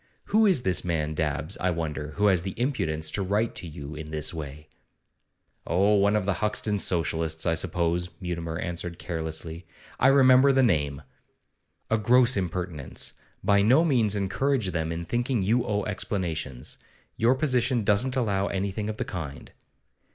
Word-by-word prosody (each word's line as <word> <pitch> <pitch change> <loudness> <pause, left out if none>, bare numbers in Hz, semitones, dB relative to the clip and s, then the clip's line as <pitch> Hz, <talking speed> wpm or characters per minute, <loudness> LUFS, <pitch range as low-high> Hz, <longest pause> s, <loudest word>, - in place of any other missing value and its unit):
Who 220 0 +6
is 175 -11 +2
this 95 -1 +1
man 80 -3 -1
Dabbs, 75 -1 -2
I 90 - +1
wonder, 75 -3 -3
who 105 - +1
has 95 -4 +4
the 95 +4 -6
impudence 80 - -1
to 100 - -2
write 105 +4 0
to 90 - -7
you 75 -1 -8
in 75 0 -7
this 75 0 -1
way?' 75 -1 -7 1.0
'Oh, 100 +5 +3
one 100 +1 +3
of 105 -3 0
the 100 - +1
Hoxton 105 -1 0
Socialists, 80 -3 0
I 80 - +2
suppose,' 85 +1 0
Mutimer 85 -3 -4
answered 85 -1 -3
carelessly. 80 0 -5 0.3
'I 130 - +5
remember 135 0 +6
the 135 -1 +3
name.' 75 - +1 0.9
'A 110 - +3
gross 125 +3 +4
impertinence! 90 -6 -3 0.3
By 100 +1 +4
no 130 +11 +5
means 115 -9 +2
encourage 100 +3 0
them 80 -1 -2
in 85 +1 -4
thinking 120 +1 0
you 115 +5 +2
owe 105 -4 -1
explanations. 85 - -3 0.4
Your 120 +4 +3
position 130 -4 +1
doesn't 115 +6 +2
allow 100 -6 0
anything 100 +2 -2
of 110 - -4
the - - -2
kind. 75 -7 -7
95 Hz, 160 wpm, -26 LUFS, 80-110 Hz, 1.0 s, Who